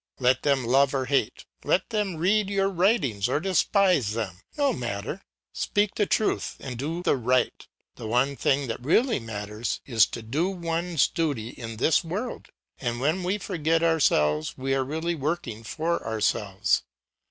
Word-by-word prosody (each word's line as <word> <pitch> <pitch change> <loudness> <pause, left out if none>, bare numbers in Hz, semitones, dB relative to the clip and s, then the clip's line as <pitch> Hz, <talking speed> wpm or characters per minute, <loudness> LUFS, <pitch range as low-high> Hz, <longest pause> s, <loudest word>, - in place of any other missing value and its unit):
Let 130 0 +3
them 140 -4 +1
love 135 +3 +3
or 130 -1 0
hate, 135 -4 0 0.2
let 185 - +1
them 210 -5 -1
read 195 +5 +2
your 195 -1 +1
writings 175 - +1
or 140 - +1
despise 185 - +2
them; 100 -6 -4 0.2
no 285 -1 +2
matter. 110 -5 -4 0.3
Speak 205 0 0
the 210 - 0
truth 215 - 0
and 130 -2 -6
do 160 +8 -3
the - - +3
right; 125 0 0 0.3
the - - -6
one 125 +5 +1
thing 140 +1 +1
that 115 +1 -5
really 225 - +3
matters 105 0 -4
is 115 -5 +4
to 115 - -7
do 150 +11 0
one's 170 -3 0
duty 145 -10 -2
in 115 -2 -8
this 155 +9 +3
world; 200 +9 -5 0.3
and 120 -2 -2
when 155 +8 +1
we 185 +3 0
forget 165 -5 0
ourselves 80 - +2
we 135 +1 -1
are 135 0 +1
really 160 +5 -2
working 140 -7 -3
for 160 +10 -2
ourselves. 105 -3 0
140 Hz, 165 wpm, -26 LUFS, 120-175 Hz, 0.3 s, is